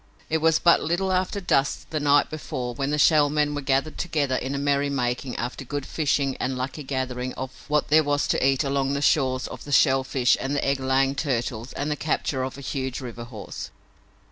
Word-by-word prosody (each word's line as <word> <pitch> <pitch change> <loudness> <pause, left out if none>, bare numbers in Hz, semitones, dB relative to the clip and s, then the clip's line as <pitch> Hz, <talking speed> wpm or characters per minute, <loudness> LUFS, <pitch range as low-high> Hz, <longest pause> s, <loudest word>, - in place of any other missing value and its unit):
It 160 - +2
was 160 0 +4
but 170 - +4
little 180 +4 0
after 185 +2 0
dusk 140 -7 0
the 155 - -1
night 145 0 +3
before 125 -5 -4
when 135 +3 -2
the 150 - 0
Shell 150 -1 +5
Men 150 0 +1
were 145 - -3
gathered 135 +3 0
together 145 -6 0
in 130 +2 -2
merrymaking 140 -3 0
after 125 +3 -4
good 145 +1 -4
fishing 140 -3 0
and 130 0 -2
lucky 130 +4 -4
gathering 130 -2 -3
of 130 0 -5 0.2
what 150 -1 +1
there 155 +2 +6
was 145 0 0
to - - +1
eat 135 +2 +3
along 140 0 0
the 140 0 -1
shores 130 -4 +2
of - - -9
the 145 - -8
shell 135 -1 +4
fish 130 -2 +2
and 135 +2 -2
the - - 0
egg 140 0 +1
laying 135 +1 +2
turtles 125 -4 -2
and 145 +2 -2
the - - 0
capture 145 -3 -1
of 130 +1 -4
a - - -8
huge 130 -1 -3
river 120 -3 -7
horse. 110 -4 -8
140 Hz, 210 wpm, -25 LUFS, 130-150 Hz, 0.2 s, there